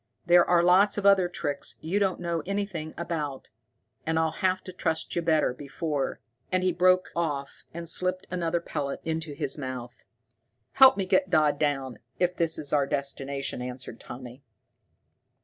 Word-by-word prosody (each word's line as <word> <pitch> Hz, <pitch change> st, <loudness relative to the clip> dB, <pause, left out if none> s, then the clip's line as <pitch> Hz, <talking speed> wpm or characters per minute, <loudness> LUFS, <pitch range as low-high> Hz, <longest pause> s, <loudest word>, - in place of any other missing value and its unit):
There 175 Hz, 0 st, +7 dB
are 175 Hz, -1 st, +3 dB
lots 190 Hz, +4 st, +5 dB
of 200 Hz, -, -2 dB
other 195 Hz, -3 st, +5 dB
tricks 145 Hz, -5 st, -3 dB
you 175 Hz, +6 st, -1 dB
don't 195 Hz, -2 st, +1 dB
know 170 Hz, -2 st, -2 dB
anything 190 Hz, -6 st, -3 dB
about, 150 Hz, -5 st, -4 dB, 0.5 s
and 160 Hz, 0 st, 0 dB
I'll 160 Hz, -1 st, +2 dB
have 185 Hz, -1 st, +1 dB
to 185 Hz, -, -8 dB
trust 160 Hz, -2 st, -2 dB
you 170 Hz, -, +1 dB
better 160 Hz, -5 st, +2 dB
before 145 Hz, +1 st, -3 dB, 0.2 s
" 125 Hz, -, -43 dB
He 185 Hz, 0 st, +2 dB
broke 185 Hz, +2 st, +3 dB
off 145 Hz, -5 st, -3 dB
and 170 Hz, 0 st, -7 dB
slipped 185 Hz, +2 st, -1 dB
another 170 Hz, -1 st, 0 dB
pellet 145 Hz, -4 st, -4 dB
into 160 Hz, -1 st, -2 dB
his 145 Hz, -1 st, -2 dB
mouth. 130 Hz, -2 st, -6 dB, 0.7 s
"Help 265 Hz, -2 st, +7 dB
me 195 Hz, -, 0 dB
get 280 Hz, +9 st, +2 dB
Dodd 150 Hz, -2 st, +3 dB
down, 135 Hz, -4 st, -1 dB, 0.2 s
if 180 Hz, 0 st, +1 dB
this 165 Hz, -2 st, +1 dB
is 150 Hz, -2 st, -4 dB
our 140 Hz, -2 st, +3 dB
destination," 140 Hz, -1 st, -3 dB
answered 125 Hz, -2 st, -6 dB
Tommy. 125 Hz, +1 st, -10 dB
160 Hz, 165 wpm, -27 LUFS, 140-180 Hz, 0.7 s, There